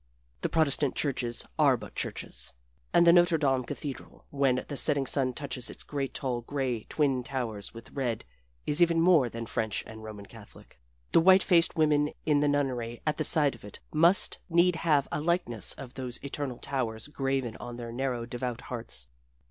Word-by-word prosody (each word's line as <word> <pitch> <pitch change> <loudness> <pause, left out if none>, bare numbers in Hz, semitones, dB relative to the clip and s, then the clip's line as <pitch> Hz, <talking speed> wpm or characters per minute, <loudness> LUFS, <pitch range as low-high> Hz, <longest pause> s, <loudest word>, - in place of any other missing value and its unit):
The - - -1
Protestant 150 -3 +1
churches 125 -4 -1
are 140 -4 +5
but 105 -2 -10
churches. - - -4 0.4
And 170 - +5
the 170 - +7
Notre 175 -1 +5
Dame 135 -4 +1
cathedral, 140 +2 -7
when 135 -3 +1
the 145 - -5
setting 140 -1 +5
sun 130 -1 +3
touches 130 -2 -3
its - - -8
great, 140 -2 -4
tall, 125 -3 -2
gray, 125 -3 -3
twin 135 -4 +1
towers 115 -6 -4
with 115 - -11
red, 125 -5 -2 0.4
is 150 +4 +3
even 170 -1 +4
more 165 -7 +5
than 115 0 -6
French 110 -1 -2
and 110 0 -10
Roman 105 -2 -8
Catholic. 105 - -15 0.3
The - - +5
white 190 +2 +6
faced 170 -3 +4
women 150 -2 +2
in 150 -2 +3
the 145 - +2
nunnery 125 -5 -1
at 150 -1 0
the 155 - 0
side 150 -3 +4
of 115 - -12
it 105 - -10
must 170 +5 +3
need 170 +1 +3
have 150 -4 +2
a 150 - -2
likeness 160 - +1
of 130 -2 -10
those 125 -2 -4
eternal 140 -2 -4
towers 115 -4 -3
graven 135 -5 -2
on 120 0 -7
their 120 -1 -7
narrow 125 -1 -2
devout 120 0 -4
hearts. 115 - -5
135 Hz, 180 wpm, -29 LUFS, 120-150 Hz, 0.4 s, the